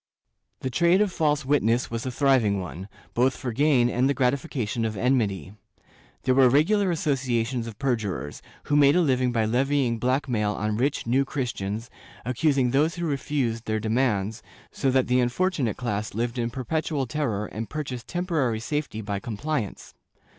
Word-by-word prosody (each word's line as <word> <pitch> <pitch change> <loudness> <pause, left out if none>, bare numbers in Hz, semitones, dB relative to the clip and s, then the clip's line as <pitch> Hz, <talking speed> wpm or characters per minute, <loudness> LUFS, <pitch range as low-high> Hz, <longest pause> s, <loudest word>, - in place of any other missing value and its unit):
^ - - -51
The 130 - -3
trade 170 +6 +4
of 210 -2 +2
false 150 -4 +1
witness 125 -4 +1
was 115 +3 -3
a - - -2
thriving 125 -7 +2
one, 90 +1 -7 0.3
both 125 +2 +2
for 125 - -4
gain 135 -1 +3
and 125 +2 +1
the 140 - +1
gratification 125 -3 -1
of 110 -2 -2
enmity. 105 - 0 0.7
There 130 - +3
were 130 -1 +6
regular 185 - +3
associations 130 -7 -1
of 110 -3 -8
perjurers, 105 - -2 0.2
who 145 - 0
made 145 -1 +6
a 180 - +4
living 130 -5 +2
by 115 -2 +1
levying 125 0 +1
black 130 +4 0
mail 105 -4 0
on 105 +1 -2
rich 135 +6 0
New 130 +4 +2
Christians, 115 -5 -4 0.3
accusing 130 0 +1
those 150 +5 +2
who 175 -1 -3
refused 135 -6 -1
their 110 0 -1
demands, 110 -1 0 0.3
so 135 - 0
that 130 0 +3
the 125 +1 +2
imfortunate 125 - 0
class 105 -4 -3
lived 120 +2 -2
in 115 0 0
perpetual 140 +3 -2
terror 120 -7 -2
and 110 +1 -6
purchased 135 -6 -5
tem 175 0 -3
porary 135 -11 0
safety 140 -2 -3
by 100 -2 -3
compliance. 115 - -4
125 Hz, 170 wpm, -25 LUFS, 115-140 Hz, 0.7 s, were